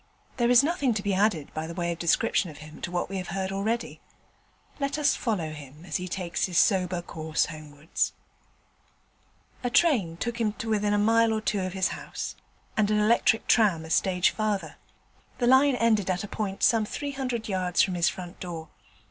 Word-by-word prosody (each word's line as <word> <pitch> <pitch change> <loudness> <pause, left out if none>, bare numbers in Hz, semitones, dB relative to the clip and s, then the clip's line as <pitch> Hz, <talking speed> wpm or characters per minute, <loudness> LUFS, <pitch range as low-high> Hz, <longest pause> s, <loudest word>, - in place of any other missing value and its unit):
There 240 -1 +2
is 245 +2 +7
nothing 285 -7 +1
to 200 - -2
be 200 -1 0
added 190 -6 +1
by 160 +1 -4
way 170 0 -2
of 170 - -5
description 175 +2 +2
of 150 - -11
him 155 0 -12
to - - -3
what 175 0 -2
we 195 - -5
have 185 -1 -4
heard 190 +1 -3
already. 215 +4 -2 0.8
Let 280 +1 -1
us 300 - +3
follow 185 -10 -2
him 150 +2 -11
as 160 - -2
he 180 - -5
takes 180 -1 -2
his 180 -2 -3
sober 180 -4 +2
course 160 -2 -1
homewards. 155 0 -3 1.5
A 245 - 0
train 240 - +2
took 235 +4 -3
him 215 -2 +1
to 225 - -7
within 205 -1 +1
a - - +2
mile 225 +2 +4
or 220 - 0
two 210 -2 -1
of 185 -1 -3
his 190 -2 +1
house, - - -6 0.4
and 210 -1 +2
an 215 - +2
electric 225 +1 +3
tram 190 -9 +3
a 160 - -8
stage 180 +1 +3
farther. 215 -3 -2 0.6
The 245 - 0
line 265 +2 +5
ended 220 -5 +2
at 180 +1 0
a - - -5
point 195 -2 -4
some 225 -2 +4
three 285 +7 -4
hundred 255 -4 -3
yards 185 -3 +1
from 190 - -1
his 170 -3 +2
front 180 -1 -8
door. 165 -3 -6
195 Hz, 200 wpm, -27 LUFS, 175-225 Hz, 1.5 s, is